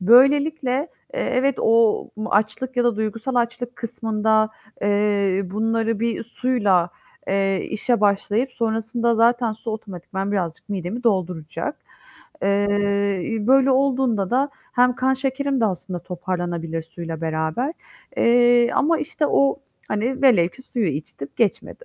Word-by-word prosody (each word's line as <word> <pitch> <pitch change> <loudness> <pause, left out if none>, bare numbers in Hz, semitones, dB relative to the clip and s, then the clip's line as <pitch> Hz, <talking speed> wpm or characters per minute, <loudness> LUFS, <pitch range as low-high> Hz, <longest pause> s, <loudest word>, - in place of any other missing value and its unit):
Böylelikle, 275 +7 +4 0.4
eee, - - -2
evet 265 - +1
o 225 -1 +3 0.2
açlık 220 +5 0
ya 245 - +2
da 240 -3 +2
duygusal 220 +4 -3
açlık 240 0 -1
kısmında, 220 -2 0 0.3
eee, 205 -1 +1
bunları 225 +3 -1
bir 230 -1 -1
suyla, 210 -8 +1 0.4
eee, 195 0 +1
işe 235 +1 0
başlayıp 210 +5 +1
sonrasında 230 +1 0
zaten 235 0 +3
su 225 +1 -6
otomatikman 195 -2 -5
birazcık 175 -4 -3
midemi 200 +4 -4
dolduracak. 185 - -1 0.7
Eee, 200 0 +1
iii, 220 +2 -3
böyle 270 +1 +5
olduğunda 260 -7 +1
da 270 +3 +1 0.2
hem 250 0 +3
kan 260 +2 +1
şekerim 270 0 -1
de - - +3
aslında 185 -2 -4
toparlanabilir 175 -2 -4
suyla 165 0 -7
beraber. 160 - -1 0.4
Eee, 240 0 +4
ama, 330 +3 +2
işte, 305 0 -1
o, 275 0 +2 0.3
hani, 245 +6 -2
velev 210 -11 +5
ki 260 - -16
suyu 240 -5 -2
içtim, 145 -1 -5
geçmedi. 230 - -1
220 Hz, 130 wpm, -22 LUFS, 195-250 Hz, 0.7 s, böyle